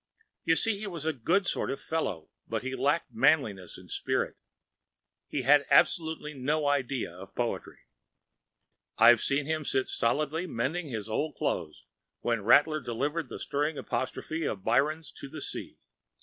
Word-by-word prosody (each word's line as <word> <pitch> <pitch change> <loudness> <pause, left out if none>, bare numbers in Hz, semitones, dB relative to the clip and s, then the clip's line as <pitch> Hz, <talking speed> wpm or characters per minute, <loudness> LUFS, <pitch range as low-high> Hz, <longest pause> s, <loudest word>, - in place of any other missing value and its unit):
You 165 - +4
see 220 +2 +1
he 215 - -5
was 170 -5 -6
a 160 - +1
good 175 - +1
sort - - -1
of 135 - -3
fellow, 105 - -3 0.2
but - - -2
he 130 0 -3
lacked 145 -2 0
manliness 115 - +2
and - - -12
spirit. - - -1 0.9
He 135 - -2
had 145 +2 +6
absolutely 160 +1 +3
no 145 +3 0
idea 135 -8 0
of 95 +2 -12
poetry. 120 -1 -3 1.2
I’ve - - +7
seen 140 +1 +1
him 155 0 -1
sit 130 -2 0
stolidly 155 +8 0
by, - - -9
mending 150 +9 -1
his 110 -5 -4
old 145 +7 -2
clothes, 75 - -3 0.4
when 115 -2 0
Rattler 150 +7 +5
delivered 140 +5 -2
that - - -7
stirring 145 +2 -1
apostrophe 155 +5 -3
of 100 -9 -3
Byron’s 140 +7 +1
to 140 - -9
the 155 - -9
ocean. 150 - -5
145 Hz, 160 wpm, -29 LUFS, 120-160 Hz, 1.2 s, I’ve